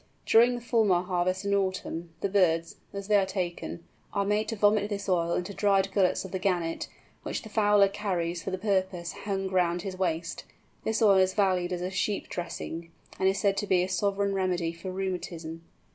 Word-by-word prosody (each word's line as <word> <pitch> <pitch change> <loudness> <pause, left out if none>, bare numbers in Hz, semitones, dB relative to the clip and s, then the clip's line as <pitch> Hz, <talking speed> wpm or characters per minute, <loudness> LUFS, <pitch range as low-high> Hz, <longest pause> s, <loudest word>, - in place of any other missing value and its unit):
During 240 +2 +5
the 240 - -6
Fulmar 220 -7 +2
harvest 185 +1 0
in 200 - +1
autumn, 185 -3 -1
the - - +1
birds, 170 -4 +2
as 200 0 -6
they 210 -1 +5
are 195 - +3
taken, 180 -3 -4 0.3
are 200 -1 +1
made 210 +1 +1
to 225 - -2
vomit 205 0 +3
this 200 -1 -4
oil 170 -2 +1
into 180 +3 -3
dried 195 -1 +2
gullets 190 -1 +2
of 190 - -8
the 190 - -2
Gannet, 175 -3 -1 0.3
which - - -4
the 220 - -9
fowler 205 -2 +4
carries 180 -4 -2
for - - -4
the 185 - -2
purpose 190 -3 -1
hung 195 -1 -3
round 175 -2 +1
his 190 -2 -4
waist. 165 -2 -2 0.4
This 220 +1 +1
oil 200 -3 +6
is 185 0 +2
valued 185 -3 +2
as 180 -1 -2
a 185 - -2
sheep 205 +1 -1
dressing, 170 -1 -5 0.3
and 190 - +4
is 195 - 0
said 200 -2 +2
to 205 - -1
be 180 -2 +3
a - - -1
sovereign 200 +1 0
remedy 180 -3 0
for 170 +3 -7
rheumatism. 175 -3 -4
190 Hz, 200 wpm, -28 LUFS, 175-200 Hz, 0.4 s, oil